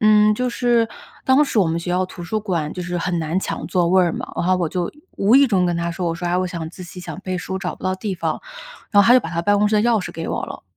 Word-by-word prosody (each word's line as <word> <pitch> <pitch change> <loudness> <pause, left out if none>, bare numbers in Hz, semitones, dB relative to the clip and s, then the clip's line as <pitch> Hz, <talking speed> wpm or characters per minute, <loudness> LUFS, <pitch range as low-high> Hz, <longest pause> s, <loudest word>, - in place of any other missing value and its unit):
嗯， 215 0 +5
就 250 +3 -1
是， 235 -2 +2 0.4
当 265 +3 +5
时 255 - -1
我 195 - +4
们 165 +1 -1
学 175 - -4
校 180 +1 +1
图 180 - -10
书 215 +5 -2
馆 170 -8 -2
就 180 - -5
是 175 0 -3
很 175 0 -1
难 160 +2 -1
抢 - - -4
座 175 -2 +1
位 185 +1 +5
儿 170 -2 +1
嘛， - - -5
然 - - -1
后 185 - +4
我 175 -3 0
就 175 +1 -2 0.3
无 205 +4 +3
意 280 +1 +7
中 195 -7 +2
跟 175 -1 0
她 170 0 -1
说， 175 +1 -3
我 165 - 0
说： 175 +1 -4
“啊， 180 - +1
我 185 - 0
想 170 -3 -5
自 185 - -10
习、 180 +1 -9
想 180 - -7
背 185 -1 -3
书 190 +1 -4
找 185 -2 -4
不 - - -19
到 185 0 0
地 190 +1 -4
方。” 180 - -2 0.5
然 205 -1 +6
后 - - +2
她 240 - +7
就 255 - +6
把 - - -6
她 170 -1 -1
办 205 +3 +3
公 210 +1 +3
室 215 - +2
的 210 - +3
钥 230 -2 +3
匙 180 - -5
给 165 - -5
我 - - -2
了。 - - -8
185 Hz, 340 characters per minute, -21 LUFS, 175-210 Hz, 0.5 s, 意